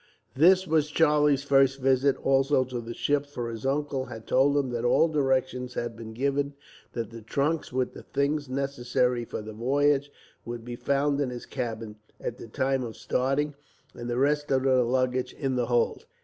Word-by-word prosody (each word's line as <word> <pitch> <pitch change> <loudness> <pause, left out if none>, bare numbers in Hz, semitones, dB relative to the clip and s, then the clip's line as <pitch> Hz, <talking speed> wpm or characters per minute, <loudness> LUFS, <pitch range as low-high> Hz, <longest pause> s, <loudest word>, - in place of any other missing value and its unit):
This 185 +6 +5
was 155 -3 +1
Charlie's 150 -3 +3
first 135 -1 +3
visit, 135 +1 +3
also, 135 0 +3
to 125 -1 -5
the 115 0 -7
ship, 145 0 0
for 120 -5 -5
his 115 +3 -4
uncle 140 -1 -1
had 115 -3 -9
told 140 +2 +3
him 135 -3 0
that 120 -1 -2
all 125 +6 +4
directions 130 -4 0
had 120 -1 -3
been 110 -1 -8
given, 140 +2 -1 0.4
that 115 -1 -4
the 115 0 -9
trunks 145 +8 -1
with 130 0 -1
the - - -10
things 145 0 -1
necessary 125 -2 0
for 110 - -6
the 110 0 -8
voyage 140 +5 +1 0.3
would 120 -1 -7
be 120 0 -5
found 140 +2 +1
in 135 - 0
his 125 -1 -7
cabin, 115 -4 -5 0.2
at 120 - -5
the - - -9
time 130 +4 0
of 115 -2 -7
starting, 135 +4 0 0.4
and 120 0 -7
the 120 - -1
rest 145 +2 +1
of 130 -1 +2
the 130 -1 +4
luggage 130 +1 0
in 135 -3 -2
the 120 -2 0
hold. 120 -1 0
130 Hz, 190 wpm, -27 LUFS, 120-145 Hz, 0.4 s, This